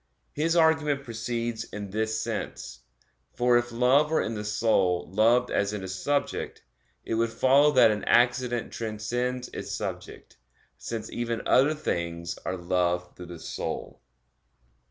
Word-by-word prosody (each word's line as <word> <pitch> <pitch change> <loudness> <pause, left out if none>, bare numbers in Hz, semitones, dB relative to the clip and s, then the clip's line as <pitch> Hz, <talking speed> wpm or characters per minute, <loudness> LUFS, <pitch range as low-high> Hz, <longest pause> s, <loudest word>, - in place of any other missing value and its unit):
His 165 +3 0
argument 160 -4 +3
proceeds 115 -1 -3
in 105 -3 -8
this 110 +1 -1
sense; - - -5 0.6
for 120 0 +3
if 120 0 +1
love 130 +5 +3
were 160 - +2
in 110 - -3
the 105 -1 -4
soul 95 -5 +1
loved 115 +4 +3
as 100 +1 0
in 105 -2 -4
a - - -5
subject, 140 +10 -2 0.4
it - - -3
would 115 +1 +1
follow 135 +5 +4
that 125 -4 +6
an 105 - -3
accident 120 0 +2
transcends 120 +3 -3
its - - -7
subject, - - -6 0.4
since 110 -1 -6
even 120 -1 -3
other 145 +4 +4
things 85 - -3
are 95 - -2
loved 90 0 -1
through 90 - -10
the 85 0 -8
soul. - - -5
115 Hz, 145 wpm, -27 LUFS, 105-125 Hz, 0.6 s, that